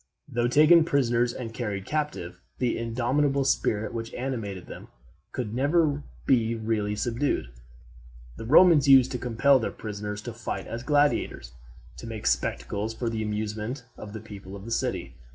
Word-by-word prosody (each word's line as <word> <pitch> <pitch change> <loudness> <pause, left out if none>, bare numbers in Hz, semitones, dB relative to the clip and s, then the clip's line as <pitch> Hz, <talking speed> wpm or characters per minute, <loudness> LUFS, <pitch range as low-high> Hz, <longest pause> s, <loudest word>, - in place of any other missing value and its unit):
Though 120 -3 0
taken 155 +6 +6
prisoners 120 -5 +1
and 115 -2 -7
carried 105 -5 -4
captive, 145 - -3 0.2
the 125 -2 0
indomitable 130 +4 0
spirit 110 -5 0
which 115 -1 -5
animated 115 -8 -4
them - - -10 0.4
could 120 -5 -4
never 145 +3 +2 0.2
be 115 -3 +2
really 110 -2 -1
subdued. 115 - -1 0.9
The - - -8
Romans 155 +2 +6
used 135 -2 +7
sometimes 125 - -4
to - - -3
compel 130 +4 +4
their 115 - -2
prisoners 105 -1 -6
to 120 - -6
fight 115 0 -5
as 115 - -5
gladiators, 145 - +1 0.5
to - - -8
make 110 -1 -6
spectacles 110 +3 -1
for 115 0 -2
the 110 -1 -2
amusement 110 +4 -3
of 105 -1 -9
the 110 - -5
people 100 -3 -10
of 100 0 -10
the 115 - -7
city. 115 - -2
115 Hz, 160 wpm, -27 LUFS, 105-135 Hz, 0.9 s, used